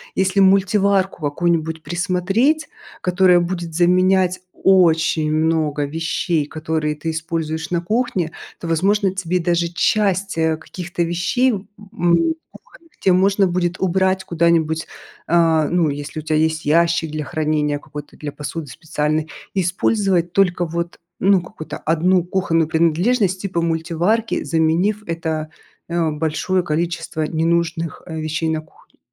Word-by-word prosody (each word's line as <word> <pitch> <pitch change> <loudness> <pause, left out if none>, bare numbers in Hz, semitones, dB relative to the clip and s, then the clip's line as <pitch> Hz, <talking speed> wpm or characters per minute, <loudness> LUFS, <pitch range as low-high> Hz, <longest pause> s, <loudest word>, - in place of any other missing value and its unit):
если 190 +1 +1
мультиварку 195 -1 +3
какую-нибудь 160 +1 -1
присмотреть, 190 - 0 0.3
которая 180 0 +4
будет 175 -1 -3
заменять 185 +1 +3 0.3
очень 165 -4 +4
много 155 -2 +1
вещей, 160 +1 -1
которые 155 -1 -2
ты 160 +2 -3
используешь 160 0 -3
на 175 -1 0
кухне, 190 -5 -1 0.3
то, 170 - -6
возможно, 195 +4 +2
тебе 180 -1 -1
даже 170 0 +1
часть, 195 +1 0
э, 160 -1 +1
каких-то 175 +1 -4
вещей, 175 +10 +1
м, 200 -3 -5 0.8
кухонных, 330 -1 -19
те 190 - +3
можно 195 +2 +3
будет 175 0 -1
убрать 190 +1 +1
куда-нибудь, 165 -1 +1 0.4
а, 165 -2 +3
ну, 170 -3 +2
если 145 +2 -5
у - - -7
тя 155 0 -2
есть 160 0 +1
ящик 165 +1 +2
для 155 -1 -3
хранения, 150 -1 0
какой-то 145 0 -10
для 145 -1 -5
посуды 150 +3 -6
специальной, 155 +1 -2 0.2
и 190 - +1
использовать 180 -1 +1
только 180 -3 +2
вот, 170 +1 -4 0.2
ну, 195 -1 +4
какую-то 155 -3 -8
1 170 +3 +2
кухонную 165 -3 0
принадлежность 180 +5 +1
типа 175 -4 -1
мультиварки, 170 +7 0
заменив 170 +6 +1
это, 160 -2 -3 0.4
э, 170 -2 0
большое 160 +4 -1
количество 170 0 -2
ненужных, 165 0 -1
э, 160 -1 -5
вещей 160 +1 -2
на 160 -1 -1
кухне. 155 - -25
170 Hz, 130 wpm, -20 LUFS, 160-185 Hz, 0.8 s, которая